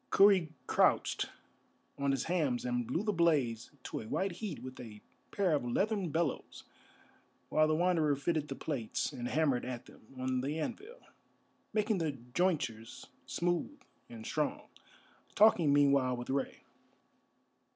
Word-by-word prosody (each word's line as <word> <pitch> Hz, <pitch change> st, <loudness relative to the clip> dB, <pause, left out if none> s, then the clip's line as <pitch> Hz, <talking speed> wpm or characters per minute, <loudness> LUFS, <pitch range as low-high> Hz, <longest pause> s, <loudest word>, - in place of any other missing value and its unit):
Kurri 195 Hz, -5 st, +5 dB, 0.2 s
crouched -, -, +2 dB, 0.7 s
on 140 Hz, 0 st, -1 dB
his 135 Hz, -2 st, +1 dB
hams 150 Hz, -9 st, 0 dB
and 120 Hz, -1 st, -1 dB
blew 165 Hz, -, -1 dB
the 210 Hz, -1 st, 0 dB
blaze 140 Hz, -, +1 dB
to -, -, -4 dB
a 110 Hz, -, -8 dB
white 195 Hz, -, -1 dB
heat 180 Hz, -2 st, -6 dB
with 130 Hz, 0 st, -8 dB
a 110 Hz, -4 st, -9 dB, 0.3 s
pair 190 Hz, -5 st, +1 dB
of 145 Hz, -, +1 dB
leathern 195 Hz, -, 0 dB
bellows, 160 Hz, -2 st, -2 dB, 0.9 s
while 155 Hz, 0 st, +4 dB
the 155 Hz, -, +2 dB
Wanderer 165 Hz, -4 st, +2 dB
fitted 150 Hz, +1 st, -1 dB
the 135 Hz, -, -5 dB
plates 130 Hz, -9 st, -3 dB
and 120 Hz, -1 st, -4 dB
hammered 145 Hz, -3 st, +1 dB
at 125 Hz, -2 st, -5 dB
them -, -, -16 dB, 0.2 s
on 130 Hz, 0 st, -1 dB
the 145 Hz, +4 st, -2 dB
anvil, 425 Hz, -, -6 dB, 0.7 s
making 215 Hz, -2 st, +1 dB
the 160 Hz, -3 st, -1 dB
jointures 125 Hz, -3 st, -2 dB, 0.2 s
smooth 175 Hz, -, -1 dB, 0.3 s
and 110 Hz, -1 st, -9 dB
strong, 150 Hz, -2 st, -2 dB, 0.7 s
talking 190 Hz, -8 st, +5 dB
meanwhile 140 Hz, -3 st, +4 dB
with 120 Hz, +1 st, -5 dB
Rei. 135 Hz, 0 st, -2 dB
150 Hz, 140 wpm, -33 LUFS, 125-175 Hz, 0.9 s, Kurri